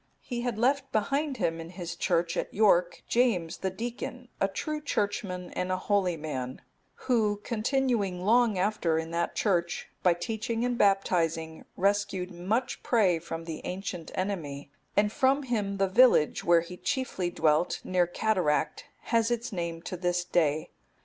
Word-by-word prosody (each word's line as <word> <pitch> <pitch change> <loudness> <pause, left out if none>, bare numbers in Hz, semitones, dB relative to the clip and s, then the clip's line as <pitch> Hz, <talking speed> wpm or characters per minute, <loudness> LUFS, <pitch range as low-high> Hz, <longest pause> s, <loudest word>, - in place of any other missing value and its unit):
He 240 -2 -4
had 240 -3 -2
left 270 +3 +1
behind 275 +6 0
him 165 -6 -1
in 165 - -8
his 175 -1 -6
Church 170 -1 0
at - - -2
York, 180 -5 +3
James, 220 -10 +1
the 190 - -1
deacon,(279) 240 +4 -6
a 195 - +4
true 305 +9 -3
churchman 200 -8 -2
and 180 0 -2
a 185 - +1
holy 185 -3 +1
man, 130 -5 -4 0.5
who 215 -5 +2
continuing 220 -6 0
long 230 -1 +4
after 180 -4 +1
in 160 0 -3
that 170 +1 -1
Church, 175 -5 0
by 180 -2 +4
teaching 225 +5 -2
and 245 0 0
baptizing, 165 -6 +1
rescued 195 -1 0
much 195 +9 -2
prey 195 -8 +3
from 165 0 -6
the 165 -2 -6
ancient 180 -3 -5
enemy; 155 -8 -3 0.3
and 205 0 +4
from 270 +4 +2
him 210 -6 -1
the 195 0 +2
village, 200 -6 +4
where 170 -1 +5
he 180 +2 -9
chiefly 255 -10 -1
dwelt, 160 -1 +2
near 180 -1 +2
Cataract,(280) 180 -5 0 0.2
has 230 -1 +3
its 240 -1 -2
name 170 -2 -3
to - - -5
this 175 0 0
day. 155 -4 +1
190 Hz, 155 wpm, -29 LUFS, 170-230 Hz, 0.5 s, where